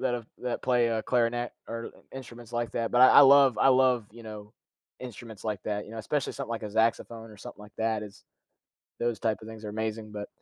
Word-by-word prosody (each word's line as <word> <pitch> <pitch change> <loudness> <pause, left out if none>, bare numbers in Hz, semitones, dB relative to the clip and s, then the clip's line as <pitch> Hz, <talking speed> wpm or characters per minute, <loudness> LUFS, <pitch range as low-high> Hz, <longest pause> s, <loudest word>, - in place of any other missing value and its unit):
that 130 -2 0
have 115 -2 -6
that 125 -1 -4
play, 120 -2 +2
uh, 110 -1 -1
clarinet 120 0 0 0.2
or 115 0 -5 0.2
instruments 120 -3 -10
like 120 -3 -1
that, 115 -1 -2
but 125 - +4
I 130 - +10
I - - +11
love 140 -2 +7
I - - +5
love, 130 -4 +3
you 115 +2 -13
know, 105 -1 -10 0.4
instruments 115 -4 -10
like 105 -3 -3
that, 105 -1 -2
you - - -13
know, 115 - -7
especially 135 +5 -2
something 135 -3 -6
like 115 -1 -4
a 105 - -5
saxophone 115 +1 0
or 105 - -14
something 100 - -11
like 105 0 -13
that 110 -1 -1
is 105 -2 -11 0.8
those 120 -1 -1
type 110 -2 0
of - - -10
things 110 -1 -10
are 105 - -5
amazing, 110 0 -4
but 105 -1 -6
115 Hz, 230 wpm, -28 LUFS, 110-120 Hz, 0.8 s, I